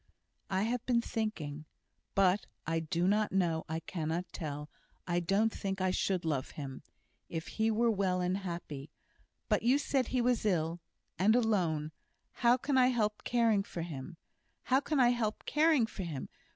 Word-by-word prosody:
"I 190 Hz, 0 st, +1 dB
have 235 Hz, +2 st, -1 dB
been 245 Hz, -2 st, +4 dB
thinking 175 Hz, -11 st, -3 dB, 0.5 s
but 195 Hz, 0 st, +3 dB, 0.2 s
I 165 Hz, +1 st, 0 dB
do 165 Hz, +2 st, 0 dB
not 210 Hz, +2 st, +2 dB
know 170 Hz, -4 st, +1 dB
I 160 Hz, +1 st, -2 dB
cannot 165 Hz, 0 st, -3 dB
tell 150 Hz, -2 st, -5 dB, 0.4 s
I 175 Hz, -1 st, +1 dB
don't 195 Hz, +6 st, +2 dB
think 195 Hz, -1 st, -3 dB
I 185 Hz, 0 st, +2 dB
should 185 Hz, -2 st, 0 dB
love 145 Hz, -5 st, -1 dB
him, 135 Hz, -3 st, -6 dB, 0.5 s
if 165 Hz, -1 st, -4 dB
he 220 Hz, 0 st, +1 dB
were 230 Hz, +1 st, +3 dB
well 190 Hz, -3 st, +1 dB
and 180 Hz, +1 st, 0 dB
happy 170 Hz, -6 st, -6 dB, 0.6 s
but -, -, +2 dB
you 250 Hz, +4 st, +4 dB
said 270 Hz, -3 st, 0 dB
he 255 Hz, -, 0 dB
was 245 Hz, 0 st, +2 dB
ill 170 Hz, -4 st, +1 dB, 0.4 s
and 210 Hz, +5 st, +5 dB
alone 175 Hz, -10 st, +1 dB, 0.4 s
how 240 Hz, +1 st, +3 dB
can 265 Hz, +1 st, +1 dB
I 250 Hz, -, +6 dB
help 215 Hz, -4 st, 0 dB
caring 230 Hz, -4 st, +3 dB
for 175 Hz, -4 st, -5 dB
him? 150 Hz, -2 st, -7 dB, 0.5 s
how 260 Hz, +1 st, +3 dB
can 290 Hz, +1 st, -1 dB
I 245 Hz, -2 st, +6 dB
help 230 Hz, -3 st, -1 dB
caring 305 Hz, -5 st, +4 dB
for 215 Hz, -, -7 dB
him?" 160 Hz, -7 st, -5 dB
195 Hz, 170 wpm, -32 LUFS, 165-230 Hz, 0.6 s, I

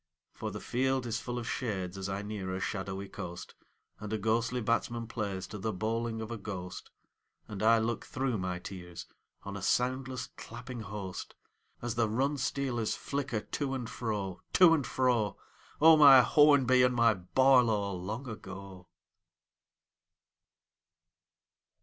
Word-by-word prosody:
For 110 Hz, -, -5 dB
the 105 Hz, +1 st, -6 dB
field 130 Hz, +2 st, 0 dB
is 115 Hz, 0 st, -2 dB
full 120 Hz, 0 st, -5 dB
of 120 Hz, -1 st, -4 dB
shades 95 Hz, -7 st, -3 dB
as 95 Hz, 0 st, -4 dB
I 100 Hz, +1 st, -3 dB
near 100 Hz, -3 st, -4 dB
a -, -, -3 dB
shadowy 95 Hz, 0 st, -4 dB
coast, 90 Hz, -1 st, -8 dB, 0.5 s
And 105 Hz, 0 st, -7 dB
a 110 Hz, -, 0 dB
ghostly 115 Hz, +4 st, 0 dB
batsman 115 Hz, 0 st, -1 dB
plays 100 Hz, -4 st, -4 dB
to 105 Hz, -, -7 dB
the 110 Hz, +3 st, -1 dB
bowling 110 Hz, +3 st, -2 dB
of 110 Hz, +1 st, -6 dB
a 115 Hz, -, -3 dB
ghost, 90 Hz, -4 st, -7 dB, 0.6 s
And 105 Hz, -2 st, -6 dB
I 115 Hz, +1 st, +5 dB
look 115 Hz, +1 st, -1 dB
through 130 Hz, -4 st, -1 dB
my 90 Hz, -1 st, -2 dB
tears 90 Hz, -2 st, -8 dB, 0.4 s
on 100 Hz, 0 st, -6 dB
a 100 Hz, -, -6 dB
soundless 130 Hz, +4 st, 0 dB
clapping 120 Hz, +1 st, -8 dB
host 100 Hz, -4 st, -6 dB, 0.5 s
As 120 Hz, -1 st, -2 dB
the 115 Hz, -2 st, +1 dB
run 135 Hz, +6 st, 0 dB
stealers 125 Hz, -4 st, -1 dB
flicker 135 Hz, -6 st, -3 dB
to 135 Hz, +2 st, -3 dB
and 125 Hz, -3 st, -4 dB
fro, 105 Hz, -6 st, -4 dB
To 180 Hz, -3 st, +7 dB
and 145 Hz, -5 st, +1 dB
fro: 120 Hz, -5 st, +1 dB, 0.4 s
O 160 Hz, +1 st, +8 dB
my 140 Hz, -3 st, +9 dB
Hornby 135 Hz, -1 st, +5 dB
and 125 Hz, 0 st, +3 dB
my 115 Hz, -1 st, +5 dB
Barlow 110 Hz, +1 st, +3 dB
long 105 Hz, +9 st, -5 dB
ago 95 Hz, -4 st, -9 dB
110 Hz, 150 wpm, -31 LUFS, 100-125 Hz, 0.6 s, my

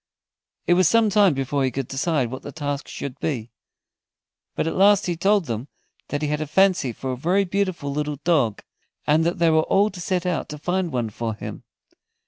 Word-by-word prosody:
It 175 Hz, -, +4 dB
was 180 Hz, -1 st, +4 dB
some 230 Hz, -2 st, +3 dB
time 200 Hz, -6 st, +4 dB
before 135 Hz, +1 st, -1 dB
he 130 Hz, -, +2 dB
could 130 Hz, 0 st, -4 dB
decide 135 Hz, -3 st, -1 dB
what 130 Hz, -, -6 dB
the 145 Hz, -, -8 dB
task 145 Hz, -1 st, -4 dB
should 135 Hz, -3 st, -6 dB
be. 120 Hz, -7 st, -3 dB, 1.0 s
But -, -, 0 dB
at 165 Hz, -, -2 dB
last 200 Hz, +1 st, +5 dB
he 175 Hz, -, -1 dB
told 195 Hz, +2 st, +2 dB
them 115 Hz, 0 st, -4 dB, 0.4 s
that 145 Hz, +1 st, -3 dB
he -, -, +1 dB
had 150 Hz, +1 st, -1 dB
a 155 Hz, -, -3 dB
fancy 185 Hz, -5 st, +3 dB
for 130 Hz, +3 st, -5 dB
a -, -, -2 dB
very 180 Hz, +9 st, +1 dB
beautiful 185 Hz, -6 st, -2 dB
little 150 Hz, 0 st, -2 dB
dog, 145 Hz, -11 st, +1 dB, 0.4 s
and 155 Hz, +2 st, +3 dB
that 170 Hz, +2 st, 0 dB
they 165 Hz, -1 st, +3 dB
were 160 Hz, 0 st, +4 dB
all 200 Hz, +6 st, +2 dB
to 180 Hz, -, -9 dB
set 180 Hz, 0 st, -1 dB
out 180 Hz, -3 st, -1 dB
to 150 Hz, -, -6 dB
find 180 Hz, +3 st, -1 dB
one 120 Hz, -4 st, -2 dB
for 115 Hz, +1 st, -3 dB
him. -, -, -8 dB
155 Hz, 210 wpm, -23 LUFS, 135-185 Hz, 1.0 s, last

